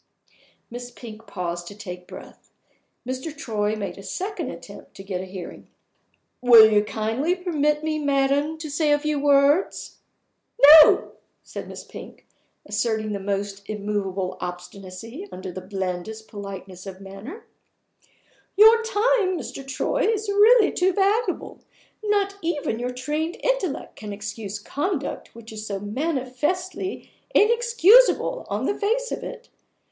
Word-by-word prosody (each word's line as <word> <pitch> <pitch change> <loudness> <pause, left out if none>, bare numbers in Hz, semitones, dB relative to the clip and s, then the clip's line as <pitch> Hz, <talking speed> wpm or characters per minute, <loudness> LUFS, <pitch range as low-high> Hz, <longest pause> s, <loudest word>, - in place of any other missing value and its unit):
Miss 245 +1 -7
Pink 225 -2 -12
paused 175 -2 -4
to 205 - -9
take 180 -3 -9
breath. - - -13 0.6
Mr. 260 +4 -5
Troy 215 -7 -1
made 200 -2 -5
a - - -8
second 370 - -4
attempt - - -11
to 195 - -10
get 190 -2 -4
a - - -6
hearing. 185 -2 -9 0.7
"Will 235 -3 +9
you 210 0 +4
kindly 225 - -1
permit 300 -5 0
me, 310 -1 -1
madam, 285 +2 +1
to 315 -1 -7
say 295 +1 +1
a 290 - +5
few 300 0 -1
words?" 285 +4 +2 0.8
"No!" - - +4 0.3
said - - -8
Miss - - -8
Pink, - - -12 0.4
asserting 220 -2 -1
the 200 - -3
most 200 0 -3
immovable 200 -3 -3
obstinacy 185 - -8
under 185 0 -7
the 185 - -7
blandest 190 +3 -5
politeness 195 -2 -9
of 190 -1 -8
manner. 195 - -10 1.1
"Your 445 +2 +8
time, 440 -3 +1
Mr. 275 - -7
Troy, 345 - 0
is 435 -1 -2
really 420 +2 +5
too 365 +1 +1
valuable! 405 +5 0 0.4
Not 405 -1 0
even 295 -9 -2
your 245 +1 -2
trained 300 +7 -3
intellect - - -1
can 210 -1 -7
excuse 205 0 -6
conduct 285 - -4
which 230 -1 -11
is 215 0 -7
manifestly 280 - -3 0.2
_in_excusable 470 +2 +4
on 210 +5 -2
the 405 - +1
face 470 +5 -1
of - - -3
it. 480 - -8
255 Hz, 135 wpm, -24 LUFS, -, 1.1 s, Will